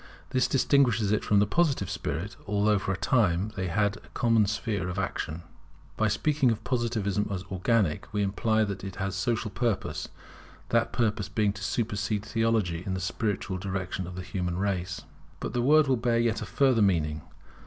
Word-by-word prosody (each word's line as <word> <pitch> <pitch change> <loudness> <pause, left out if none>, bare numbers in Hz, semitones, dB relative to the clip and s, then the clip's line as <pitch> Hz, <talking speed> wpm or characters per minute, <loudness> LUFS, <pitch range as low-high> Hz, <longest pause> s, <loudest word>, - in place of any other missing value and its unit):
This 130 -1 +2
distinguishes 125 -7 +3
it 105 - +1
from 105 - +2
the 100 - +5
Positive 140 - +1
spirit, 85 +1 -4
although 105 0 +2
for 100 - -2
a 95 - -1
time 95 -1 +2
they 95 -2 -2
had 100 +3 +1
a - - -17
common 115 -3 +3
sphere 105 -3 -2
of 90 - -5
action. 85 -3 -3 0.5
By 110 - +2
speaking 135 +5 +2
of 115 - -1
Positivism 110 -5 0
as 95 -2 -3
organic, 95 -3 +1
we 105 -1 0
imply 110 +3 +1
that 100 -3 -4
it 95 -2 -6
has 95 0 -2
a - - -3
social 110 +1 -1
purpose; 115 -1 -2 0.6
that 115 0 +2
purpose 105 -4 0
being 105 0 +1
to 100 -1 -8
supersede 105 0 -1
Theology 110 -7 0
in 95 -1 -2
the - - -3
spiritual 95 0 -2
direction 95 -1 -3
of 90 - -8
the 90 - -5
human 90 -2 -3
race. 95 -2 -2 0.4
But - - -4
the 120 - +1
word 150 +3 +5
will 130 -1 +3
bear 115 0 +1
yet 115 -1 +1
a 110 - -5
further 125 +3 +3
meaning. 80 -6 +2
105 Hz, 185 wpm, -28 LUFS, 95-115 Hz, 0.6 s, the